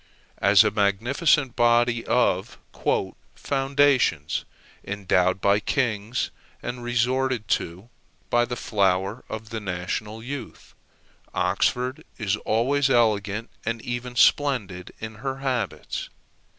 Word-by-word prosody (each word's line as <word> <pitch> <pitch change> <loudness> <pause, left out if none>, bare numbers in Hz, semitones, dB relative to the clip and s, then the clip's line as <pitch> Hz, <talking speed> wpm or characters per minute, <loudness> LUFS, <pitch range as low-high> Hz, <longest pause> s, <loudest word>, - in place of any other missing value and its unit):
As 100 +1 +6
a 105 - +1
magnificent 120 - +2
body 120 0 +3
of 110 -5 +1 0.8
"foundations," 135 - +1 0.4
endowed 95 -2 +1
by 100 +1 +3
kings, 110 0 -1 0.3
and 120 0 -5
resorted 125 -1 0
to 90 +6 -2 0.4
by 120 0 +4
the 120 0 -4
flower 100 0 0
of 110 0 -6
the 115 - -3
national 105 +3 -4
youth, 140 +2 -8 0.6
Oxford 125 +2 0
is 110 -3 0
always 135 +6 +1
elegant 110 -3 +1
and 115 +1 -2
even 120 0 -4
splendid 110 -8 +2
in 110 -1 -7
her 135 0 -3
habits. 130 -6 -3
115 Hz, 105 wpm, -25 LUFS, 100-125 Hz, 0.8 s, As